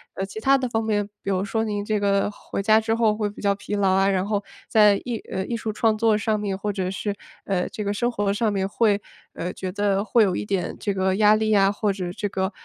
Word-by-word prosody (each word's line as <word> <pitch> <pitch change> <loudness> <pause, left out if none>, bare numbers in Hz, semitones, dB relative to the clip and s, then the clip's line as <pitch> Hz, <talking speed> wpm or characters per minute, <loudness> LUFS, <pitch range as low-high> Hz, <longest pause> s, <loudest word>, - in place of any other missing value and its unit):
呃， 195 - -2
其 195 +2 -8
他 270 +3 +4
的 260 -1 -2
方 225 -2 -1
面， 205 -2 0 0.2
比 - - -3
如 190 0 0
说， 220 +2 -1
您 205 -2 -2
这 215 0 0
个 200 0 +1
回 205 -1 -6
家 215 +2 +4
之 225 0 0
后 225 -2 +2
会 210 -1 -1
比 205 - -11
较 200 -1 +2
疲 205 +1 -5
劳 200 -2 +2
啊， 195 +1 +3
然 190 -1 +1
后 205 -1 -1 0.2
在 210 -2 +5
艺 240 -2 -2
呃， 190 - -2
艺 235 - -3
术 220 -1 -3
创 215 0 +1
作 220 -1 +3
上 215 0 0
面， 200 -2 -3
或 205 +1 -2
者 185 -2 -2
是， 200 +2 -3 0.3
呃， 185 -2 0
这 210 - -5
个 200 0 -1
生 240 +4 0
活 205 -3 0
上 215 +1 +1
面， 195 -1 -1
会 205 0 +1 0.3
呃， 180 +2 -4
觉 185 -1 -5
得 200 0 0
会 225 +1 +4
有 185 -3 +1
一 - - -3
点 195 -3 -2
这 200 - -1
个 190 0 +1
压 210 +1 +5
力 220 0 0
呀， 195 -2 +4
或 205 0 0
者 180 -2 -4
这 205 - -3
个 190 0 -1
205 Hz, 285 characters per minute, -24 LUFS, 195-215 Hz, 0.3 s, 在